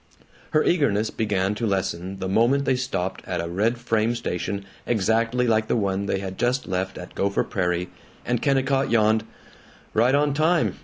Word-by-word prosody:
Her 155 - +3
eagerness 115 - +2
began 100 -2 0
to 115 +2 -2
lessen 95 -1 -2
the 95 - -4
moment 120 +8 +3
they - - +2
stopped 125 -8 -3
at - - -2
a 85 - -2
red 105 +8 0
frame 115 0 0
station 100 -2 -3 0.2
exactly 115 +3 +1
like 110 -2 +2
the - - +1
one 100 -2 0
they 95 - 0
had 95 -1 -6
just 125 +2 +1
left 95 +1 -2
at 90 - -9
Gopher 100 0 0
Prairie, 90 -3 -1 0.4
and 120 -1 0
Kennicott 135 -1 +2
yawned, 110 -1 +3 0.7
"Right 120 +5 +4
on 145 0 +2
time. 160 +3 +2
110 Hz, 170 wpm, -24 LUFS, 95-125 Hz, 0.7 s, Right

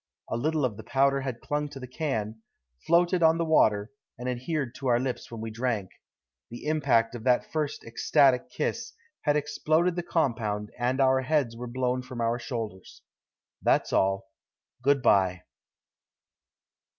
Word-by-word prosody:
A - - 0
little 150 +4 +1
of 110 -5 -3
the 110 - -8
powder 135 0 +2
had 130 -3 -5
clung 150 0 -2
to 140 - -9
the 130 - -6
can, 115 -6 -3 0.5
floated 175 +1 +3
on 160 0 +5
the 170 - 0
water, 105 -9 +3 0.3
and 125 +2 -5
adhered 130 +1 -2
to 135 - -5
our 120 -1 +4
lips 130 0 -3
when 115 -2 -7
we 110 0 -5
drank. 110 -4 -2 0.6
The 120 +4 -9
impact 140 -7 +2
of 120 -2 -7
that 125 -1 +2
first 150 -2 -2
ecstatic 125 +2 +3
kiss - - -3 0.3
had 145 -1 +3
exploded 155 +4 +1
the 175 - -1
compound 115 -11 -1
and 125 +2 0
our 130 -1 +4
heads 130 -4 0
were 125 +1 -6
blown 125 +1 -1
from 125 -1 -8
our 115 +1 0
shoulders. 110 -7 -6 0.6
That's - - +2
all. 95 0 +2 0.6
Good 140 0 +2
by." 95 -5 +3
125 Hz, 160 wpm, -27 LUFS, 115-145 Hz, 0.6 s, on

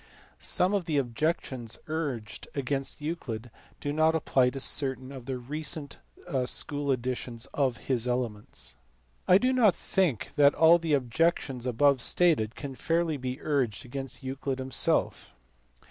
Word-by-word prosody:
Some 185 +3 +3
of 195 -4 0
the 155 -3 0
objections 130 -2 -2
urged 135 -9 -4
against 140 +1 -2
Euclid 125 -8 -5 0.3
do 145 -1 -3
not 160 +1 +3
apply 130 -5 +2
to 135 - -6
certain 130 -1 +2
of 130 -3 -10
the 130 -1 -2
recent 145 +3 -4 0.5
school 145 +2 -1
editions 125 -1 -3
of 130 -4 +1
his 125 -3 0
Elements. 120 -4 -3 0.5
I 180 - +7
do 255 +5 +1
not 225 -7 +4
think 175 - -1
that 145 -1 +6
all 165 +1 +6
the 160 -3 +1
objections 135 -1 0
above 135 +2 +3
stated 145 -9 +3
can 140 -3 -6
fairly 165 +2 0
be 130 -1 -4
urged 130 -9 -1
against 135 +1 -6
Euclid 135 0 -3
himself. 130 - +1
135 Hz, 140 wpm, -28 LUFS, 125-155 Hz, 0.5 s, I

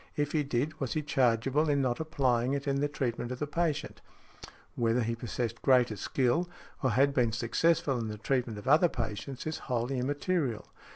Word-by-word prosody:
If 145 0 0
he 155 - +2
did, 140 +2 -2
was 135 -3 -2
he 155 - -1
chargeable 135 +2 +2
in 145 -1 +2
not 125 -3 0
applying 135 -5 +1
it 140 +1 -4
in 140 0 +1
the 145 - +2
treatment 125 -4 -3
of 125 - -3
the 150 - -2
patient? 160 0 -2 0.7
Whether 115 +1 +1
|63| - - +1
he 115 +1 -1
possessed 115 0 -4
greater 125 -4 +4
skill, 130 - 0 0.3
or 130 - +2
had 135 +5 +3
been 120 -4 +2
successful 130 +4 +1
in 115 - -3
the 105 0 -5
treatment 120 0 -1
of 105 - -9
other 155 +5 +5
patients, 125 +3 -5
is 155 0 -3
wholly 125 +2 0
immaterial. 140 - -1
130 Hz, 190 wpm, -30 LUFS, 120-145 Hz, 0.7 s, other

